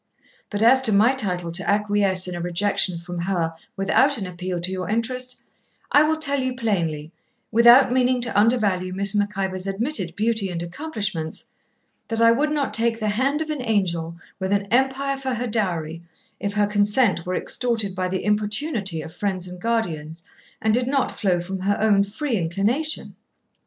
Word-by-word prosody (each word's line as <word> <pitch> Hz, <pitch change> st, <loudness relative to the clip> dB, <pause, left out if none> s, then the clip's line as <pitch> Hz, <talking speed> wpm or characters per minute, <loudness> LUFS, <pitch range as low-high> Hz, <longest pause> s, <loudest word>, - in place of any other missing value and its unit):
But 205 Hz, 0 st, -1 dB
as 260 Hz, +3 st, +6 dB
to -, -, +2 dB
my 215 Hz, +6 st, +5 dB
title 180 Hz, -9 st, -2 dB
to 175 Hz, +1 st, -2 dB
acquiesce 200 Hz, -2 st, +2 dB
in 180 Hz, -, -4 dB
a 175 Hz, -, -4 dB
rejection 175 Hz, +1 st, 0 dB
from 175 Hz, +1 st, -7 dB
her 170 Hz, -2 st, -1 dB, 0.3 s
without 265 Hz, +8 st, +3 dB
an 200 Hz, -, -4 dB
appeal 180 Hz, 0 st, -4 dB
to 175 Hz, +2 st, -1 dB
your 185 Hz, 0 st, -4 dB
interest, 250 Hz, +3 st, -3 dB, 0.5 s
I 290 Hz, -, +6 dB
will 310 Hz, +1 st, +2 dB
tell 280 Hz, -3 st, +2 dB
you 255 Hz, -1 st, -2 dB
plainly, 165 Hz, -, -2 dB, 0.4 s
without 235 Hz, +3 st, +7 dB
meaning 255 Hz, 0 st, +2 dB
to 240 Hz, -1 st, -4 dB
undervalue 205 Hz, -5 st, +2 dB
Miss 200 Hz, +1 st, +3 dB
Mac 205 Hz, 0 st, 0 dB
Ivor's 190 Hz, -1 st, -2 dB
admitted 195 Hz, -, -2 dB
beauty 220 Hz, -2 st, 0 dB
and 170 Hz, -1 st, -4 dB
accomplishments, 190 Hz, -, -4 dB, 0.5 s
that 225 Hz, -1 st, -2 dB
I 230 Hz, 0 st, +6 dB
would 290 Hz, +6 st, +1 dB
not 295 Hz, -2 st, -1 dB
take 230 Hz, 0 st, +1 dB
the 215 Hz, -1 st, -1 dB
hand 275 Hz, +8 st, 0 dB
of 310 Hz, -, -5 dB
an 295 Hz, -3 st, -3 dB
angel, 175 Hz, -8 st, -1 dB, 0.2 s
with 190 Hz, 0 st, -2 dB
an 200 Hz, 0 st, +1 dB
empire 265 Hz, +2 st, +1 dB
for 265 Hz, -2 st, -3 dB
her 240 Hz, +2 st, -3 dB
dowry, 170 Hz, -8 st, -2 dB, 0.4 s
if 200 Hz, 0 st, -3 dB
her 210 Hz, 0 st, +2 dB
consent 205 Hz, -1 st, +2 dB
were 180 Hz, +1 st, -3 dB
extorted 225 Hz, -6 st, -2 dB
by 185 Hz, 0 st, -2 dB
the 185 Hz, +1 st, -3 dB
importunity 210 Hz, -, 0 dB
of 160 Hz, -, -10 dB
friends 185 Hz, -2 st, -2 dB
and 180 Hz, 0 st, -9 dB
guardians, 170 Hz, -9 st, -2 dB, 0.4 s
and 220 Hz, 0 st, +1 dB
did 245 Hz, +2 st, +1 dB
not 270 Hz, -1 st, +1 dB
flow 180 Hz, -4 st, 0 dB
from 190 Hz, +2 st, -5 dB
her 200 Hz, +2 st, 0 dB
own 210 Hz, -2 st, +4 dB
free 230 Hz, +5 st, -2 dB
inclination.' 205 Hz, -, -1 dB
205 Hz, 180 wpm, -23 LUFS, 185-240 Hz, 0.5 s, without